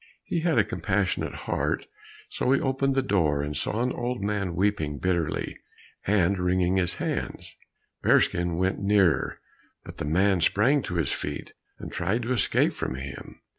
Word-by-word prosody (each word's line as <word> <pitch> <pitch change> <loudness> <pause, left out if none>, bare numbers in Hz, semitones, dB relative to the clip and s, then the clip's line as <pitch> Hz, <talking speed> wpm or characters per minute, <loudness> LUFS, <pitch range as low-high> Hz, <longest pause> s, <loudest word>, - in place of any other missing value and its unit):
He 170 - -1
had 165 -3 +1
a 110 - +6
compassionate 105 -2 -1
heart, - - -1 0.4
so 125 - -1
he 135 - +4
opened 135 0 0
the 135 - +2
door, 80 - +1
and 75 0 -4
saw 110 - -1
an 125 - 0
old 120 0 -2
man 100 -3 -1
weeping 90 -6 0
bitterly, 85 -1 -1 0.5
and 100 -1 +3
wringing 90 +1 +2
his 90 -2 +1
hands. - - -3 0.5
Bearskin 85 -1 +3
went 95 +2 0
nearer, 100 -4 +2 0.4
but - - -10
the - - -3
man 95 +4 +2
sprang 130 - +3
to 90 - -5
his 80 -6 +1
feet 75 0 -4 0.2
and - - -8
tried 100 +8 -1
to 125 +3 0
escape 120 - +2
from 65 - -3
him. 70 +1 -8
95 Hz, 165 wpm, -26 LUFS, 85-115 Hz, 0.5 s, a